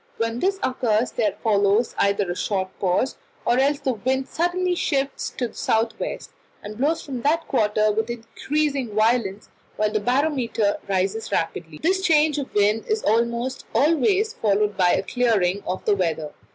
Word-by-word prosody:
When 230 +1 -1
this 390 +5 +1
occurs, 240 -2 +1
there 210 -5 -1
follows 205 +1 +2
either 200 -2 +1
a - - -3
short 190 -1 -1
pause, 190 +8 0 0.3
or 245 - +3
else 285 +2 +2
the 260 - 0
wind 260 +4 -1
suddenly 355 +2 0
shifts 275 -5 -1
to 245 -2 -1
the - - -19
south 225 +1 +1
west, - - -5 0.3
and 210 +1 -7
blows 310 +5 +1
from 260 -4 -5
that 320 +5 +1
quarter 215 -4 +2
with 220 +2 -1
increasing 255 +1 -2
violence, 215 -2 +1 0.3
while 215 0 0
the 215 - +1
barometer 245 -4 0
rises 195 +3 -1
rapidly. 165 -1 -2
The 355 +4 +4
change 315 -6 +2
of 275 - -5
wind 210 +2 +2
is 435 0 0
almost 235 +3 0
always 385 +9 +3
followed 210 -1 +1
by 180 -1 +3
a - - +1
clearing 205 -5 +1
of 185 - -3
the 210 - +4
weather. 165 -5 -2
230 Hz, 165 wpm, -23 LUFS, 205-280 Hz, 0.3 s, The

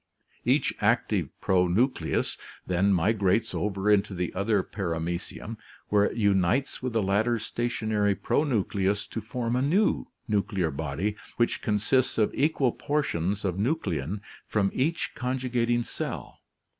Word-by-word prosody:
Each - - +3
active - - +2
pronucleus 95 +8 +2 0.3
then 90 +2 +2
migrates 100 +2 +2
over 105 0 0
into 100 -1 +2
the 90 -1 -2
other 100 0 +1
Paramecium 85 +4 -4 0.3
where 100 -1 +4
it - - -3
unites 100 +5 +2
with 130 -2 -3
the 110 -2 +2
latter's 110 +3 +1
stationary 110 -4 0
pronucleus 100 -9 0
to 115 - -5
form 120 +1 -2
a 125 - +2
new 180 +10 +2 0.2
nuclear 100 -6 0
body 80 +9 -2 0.2
which 120 - +1
consists 110 +5 +1
of 110 -2 +2
equal 140 -4 +2
portions 105 - -1
of 95 0 -1
nuclein 100 - -1 0.3
from 100 -2 +1
each 160 +6 0
conjugating 125 -2 0
cell. - - -5
105 Hz, 125 wpm, -27 LUFS, 95-120 Hz, 0.3 s, where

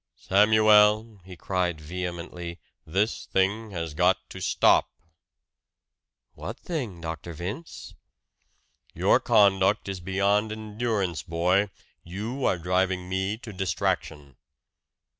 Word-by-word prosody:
"Samuel," 105 +1 +4
he 95 -1 -10
cried 90 -1 -2
vehemently, 85 +1 -6 0.3
"this 100 +7 -1
thing 105 +4 0
has 85 -5 -5
got 90 +4 +3
to 95 - -8
stop!" 85 -4 +3 1.4
"What - - -7
thing, 120 - -5
Dr. 80 +1 -6
Vince?" 95 - -7 1.0
"Your - - +4
conduct 100 0 +3
is 95 -1 -4
beyond 100 +4 +1
endurance, 110 -5 -2
boy 90 +5 +1 0.3
you 110 +10 -4
are 90 - +2
driving 90 +1 0
me 95 +3 -1
to 110 -2 -10
distraction!" 80 -6 -2
95 Hz, 105 wpm, -26 LUFS, 85-105 Hz, 1.4 s, Samuel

